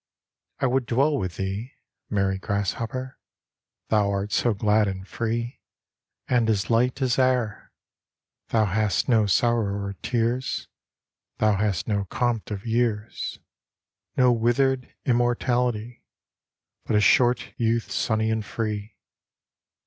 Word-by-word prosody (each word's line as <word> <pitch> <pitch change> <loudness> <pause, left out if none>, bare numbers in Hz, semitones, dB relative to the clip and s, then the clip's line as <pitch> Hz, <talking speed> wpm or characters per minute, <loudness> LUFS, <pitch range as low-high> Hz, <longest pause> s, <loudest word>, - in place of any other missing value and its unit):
II - - -63
I - - +3
would 130 0 +1
dwell 140 +5 +2
with 90 -10 -3
thee, 100 +6 -4 0.3
Merry 95 -2 0
grasshopper, 115 +6 -3 0.7
Thou 105 -2 +3
art 100 +1 -2
so 120 - +2
glad 105 +1 +3
and 95 0 -5
free, 115 +3 -3 0.7
And 120 -3 +2
as 105 0 0
light 125 +3 +2
as 125 -1 +1
air; 125 -4 0 0.8
Thou 110 -2 +2
hast 105 +1 0
no 110 -5 +4
sorrow 105 -1 +2
or 100 0 -4
tears, 120 +1 -1 0.7
Thou 110 -1 +3
hast 100 -3 0
no 100 -2 0
compt 120 +2 -1
of 105 0 -5
years, 115 -2 -1 0.8
No 125 -1 +5
withered 125 +3 +1
immortality, 120 -1 0 0.8
But - - 0
a - - +5
short 120 +4 +3
youth 115 0 0
sunny 110 -1 0
and 110 -1 -1
free. 105 0 -4
115 Hz, 125 wpm, -25 LUFS, 105-120 Hz, 0.8 s, No